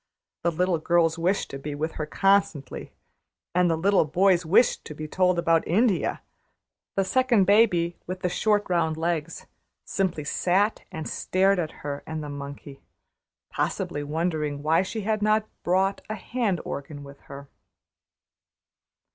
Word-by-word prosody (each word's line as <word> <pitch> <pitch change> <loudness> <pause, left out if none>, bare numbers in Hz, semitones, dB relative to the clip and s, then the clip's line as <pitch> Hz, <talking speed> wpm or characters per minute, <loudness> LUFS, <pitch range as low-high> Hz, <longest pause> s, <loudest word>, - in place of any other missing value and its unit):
The 170 +1 +1
girls 170 -1 +2
wished 185 +4 0
to 135 - -6
be 145 +1 -5
with 155 +2 -2
her 155 - -5
constantly, 195 -6 0 0.6
and 180 0 +3
the 165 - +1
little 195 +4 +3
boys 180 +3 +3
wished 200 +8 +3
to 150 - -8
be 155 +1 -6
told 180 +2 +2
about 165 -1 +3
India; 205 +2 +1 0.7
the 195 - +1
second 245 0 +3
baby, 185 -4 +3
with 185 +1 -5
the - - +1
short 205 +3 +1
round 165 -3 0
legs, 165 -1 -2 0.4
simply 185 -6 -1
sat 190 +8 +1
and 160 -1 -5
stared 190 +1 +1
at 160 -3 -1 0.2
her 145 0 -3
and 160 -1 -4
the 150 - -6
monkey, 140 -1 -8 0.7
possibly 145 - -2
wondering 150 -1 -2
why 160 +3 +3
she 215 +4 -4
had 215 +1 -1
not 215 +1 +2 0.2
brought 190 +2 +1
a 215 - -2
hand 215 -4 -2
organ 145 +1 -6
with 140 0 -12
her. 140 0 -9
175 Hz, 145 wpm, -25 LUFS, 155-195 Hz, 0.7 s, and